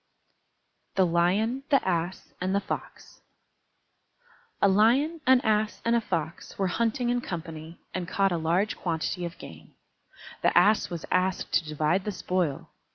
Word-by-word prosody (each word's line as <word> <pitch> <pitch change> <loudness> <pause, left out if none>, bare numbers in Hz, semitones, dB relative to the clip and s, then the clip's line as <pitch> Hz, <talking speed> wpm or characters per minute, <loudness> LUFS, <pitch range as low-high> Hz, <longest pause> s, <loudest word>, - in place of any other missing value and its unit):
_ - - -44
THE 190 - +4
LION, 190 +9 +1
THE 275 -9 +3
ASS, 175 +1 -2
AND 185 +2 0
THE - - +3
FOX 200 - -7 1.4
A - - +5
Lion, 250 - +3
an 260 -1 +6
Ass, 215 -1 +1
and 235 0 +3
a 235 - +2
Fox 160 -5 -4
were 195 - +1
hunting 235 +5 0
in 245 0 0
company, 165 -3 -7 0.2
and 180 -2 -3
caught 195 +2 +1
a 175 - 0
large 170 +6 +1
quantity 175 +1 -2
of 170 - -7
game. - - -12 0.7
The - - +3
Ass 215 +1 +4
was 170 -2 -5
asked 185 0 0
to - - +3
divide 155 +5 0
the 210 - -1
spoil. 180 -7 -2
185 Hz, 160 wpm, -27 LUFS, 170-220 Hz, 1.4 s, an